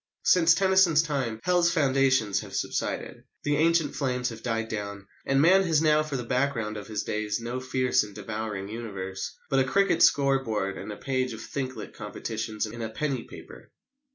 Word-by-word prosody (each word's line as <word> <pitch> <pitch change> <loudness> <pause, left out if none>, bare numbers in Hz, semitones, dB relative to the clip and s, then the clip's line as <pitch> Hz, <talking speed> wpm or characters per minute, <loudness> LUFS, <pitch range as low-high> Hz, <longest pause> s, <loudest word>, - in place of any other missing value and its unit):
Since 165 -2 +5
Tennyson's 190 -4 +4
time 135 -8 -2
Hell's 175 -1 +3
foundations 130 - +2
have - - -8
subsided: - - -3 0.2
the 145 0 +1
ancient 165 -2 +2
flames 125 -3 -1
have 115 -1 -9
died 115 -1 -2
down; 100 -2 -5 0.2
and 135 0 +3
man 185 +6 +6
has 160 -3 +3
now 155 -1 +4
for 155 -3 -3
the 125 - -4
background 120 -3 -1
of 105 -2 -7
his 105 -2 -3
days 105 0 -2
no 120 +2 -4
fierce 130 0 +1
and 105 -2 -7
devouring 105 -1 -4
universe, 100 -4 -6
but 135 - +4
a - - +4
cricket 195 +3 +2
score 135 -1 +4
board 105 -4 -2
and - - -7
a 105 - -7
page 130 -2 -1
of 110 - -8
"thinklet" 130 0 -5
competitions 110 +1 -4
in 115 +2 -7
a 110 - -3
penny 135 +1 -3
paper. - - -12
130 Hz, 180 wpm, -27 LUFS, 110-145 Hz, 0.2 s, man